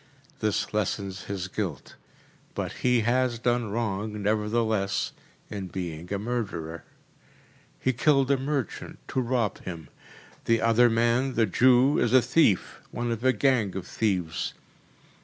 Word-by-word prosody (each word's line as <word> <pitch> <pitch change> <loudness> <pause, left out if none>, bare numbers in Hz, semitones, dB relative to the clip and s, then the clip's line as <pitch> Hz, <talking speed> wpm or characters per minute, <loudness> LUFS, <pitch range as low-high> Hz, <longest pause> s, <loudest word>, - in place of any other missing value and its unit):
This 105 0 -1
lessens 100 -2 -2
his 95 -3 -4
guilt, - - -4 0.6
but - - -3
he 125 -2 +3
has 120 +1 +1
done 120 -1 0
wrong, 105 -1 -2
nevertheless, 105 -1 0 0.4
in 95 -2 -4
being 85 -1 -6
a 100 - 0
murderer. 100 -8 -4 1.0
He 130 - +1
killed 135 +1 +3
a 140 - +4
merchant, 135 -4 -3
to 130 - 0
rob 120 -5 0
him. 85 -5 -8 0.6
The 115 0 +3
other 115 +2 +4
man, 120 +3 +1
the 115 - +4
Jew, 125 +6 +4
is 120 - +1
a 130 - +7
thief, 125 - +2
one 120 0 -3
of 115 0 -3
a 130 - +5
gang 115 -5 +1
of 95 -2 -4
thieves. 90 -8 -1
115 Hz, 140 wpm, -27 LUFS, 100-125 Hz, 1.0 s, a